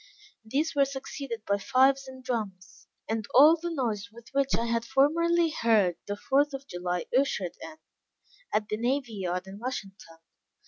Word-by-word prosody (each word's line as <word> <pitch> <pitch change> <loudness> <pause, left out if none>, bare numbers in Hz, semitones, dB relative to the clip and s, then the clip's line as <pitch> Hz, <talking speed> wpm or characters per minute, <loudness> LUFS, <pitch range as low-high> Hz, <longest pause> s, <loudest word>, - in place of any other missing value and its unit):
These 280 +9 -1
were 280 -1 +4
succeeded 270 -4 -6
by 200 0 +1
fifes 265 +5 +3
and 260 0 -11
drums, 210 -7 -5 0.2
and 220 -1 -2
all 300 +5 +9
the 340 +1 -5
noise 230 -8 -2
with 235 +1 -15
which 275 0 +1
I 230 - -1
had 230 0 0
formerly 330 +6 +3
heard 215 - +2
the 205 0 -3
fourth 280 +5 +1
of 270 0 -8
July 180 -5 -3
ushered 235 -9 +1
in, 315 - -8 0.8
at 210 - 0
the 215 - -2
Navy 245 +1 -1
Yard 180 -2 -3
in 195 +1 -10
Washington. 195 -8 -7
235 Hz, 165 wpm, -28 LUFS, 205-275 Hz, 0.8 s, all